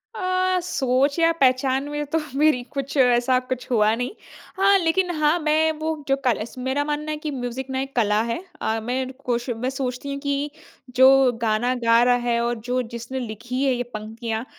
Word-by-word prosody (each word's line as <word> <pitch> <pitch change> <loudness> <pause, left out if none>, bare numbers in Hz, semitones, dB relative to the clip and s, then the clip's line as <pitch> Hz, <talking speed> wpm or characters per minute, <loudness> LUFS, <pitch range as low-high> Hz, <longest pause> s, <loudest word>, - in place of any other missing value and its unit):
अ, 370 0 +1
सोच 275 -4 +1
या 330 0 +4
पहचान 260 +1 +2
में 295 0 -3
तो - - +4 0.2
मेरी 300 -4 +3
कुछ 275 0 -4
ऐसा 250 0 +4
कुछ 255 0 -6
हुआ 215 -2 +3
नहीं। 245 +6 -3 0.5
हाँ, 395 +1 +5
लेकिन 355 +1 +1
हाँ, 305 +2 +2
मैं 315 0 +2
वो 315 0 -1
जो 270 - +3
कल 235 -4 +2
स 235 - -14
मेरा 265 +3 0
मानना 300 +1 -3
है 305 - -3
कि 300 0 -5
म्यूज़िक 255 0 -5
ना 260 - -2
एक 270 0 -7
कला 210 -2 +2
है। 230 +4 -2 0.2
अ, 220 0 0
मैं 255 +2 -1
ण 260 - -7
कोश 240 0 -1
मैं 240 +2 -2
सोचती 265 0 -4
हूँ 280 - -5
कि 285 +1 -1 0.4
जो 265 0 +6
गाना 230 +3 +1
गा 230 0 +5
रहा 245 0 +4
है 235 -1 +2
और 240 - 0
जो 250 +1 +1
जिसने 240 +3 -5
लिखी 245 +3 -4
है 270 -2 +3
ये 245 0 -2
पंक्तियाँ 220 +2 -4
260 Hz, 200 wpm, -23 LUFS, 240-295 Hz, 0.5 s, जो